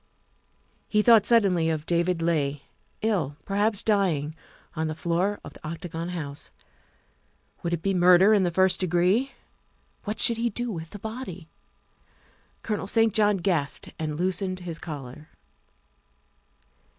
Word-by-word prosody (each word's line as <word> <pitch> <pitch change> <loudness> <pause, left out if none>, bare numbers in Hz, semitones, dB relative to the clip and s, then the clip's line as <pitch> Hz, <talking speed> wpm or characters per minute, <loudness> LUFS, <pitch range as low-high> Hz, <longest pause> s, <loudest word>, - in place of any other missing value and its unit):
He 210 0 +2
thought 225 -3 +6
suddenly 190 -8 +3
of 155 -2 -2
David 170 0 0
Leigh, 145 -4 0 0.4
ill, 170 -11 0
perhaps 205 +1 0
dying, 175 -9 +1 0.4
on 160 0 -1
the 155 - -4
floor 175 +5 -1
of 145 - -10
the - - -17
Octagon 165 +1 -5
House. 150 -5 -5 1.1
Would 170 - -3
it 170 -1 -2
be 195 - +1
murder 180 +3 +6
in 205 - +4
the 180 - +2
first 185 +2 +3
degree? 185 +9 +1 0.7
What 210 +1 -4
should 235 - +6
he 235 +1 0
do 240 +2 -3
with 165 -4 -6
the 205 - -9
body? 200 -6 -7 1.1
Colonel 210 -3 -3
St. 225 0 +2
John 210 -2 +3
gasped 170 -7 -2
and 155 -2 -3
loosened 185 0 -1
his 170 -2 -6
collar. 150 -1 -8
180 Hz, 140 wpm, -26 LUFS, 160-205 Hz, 1.1 s, thought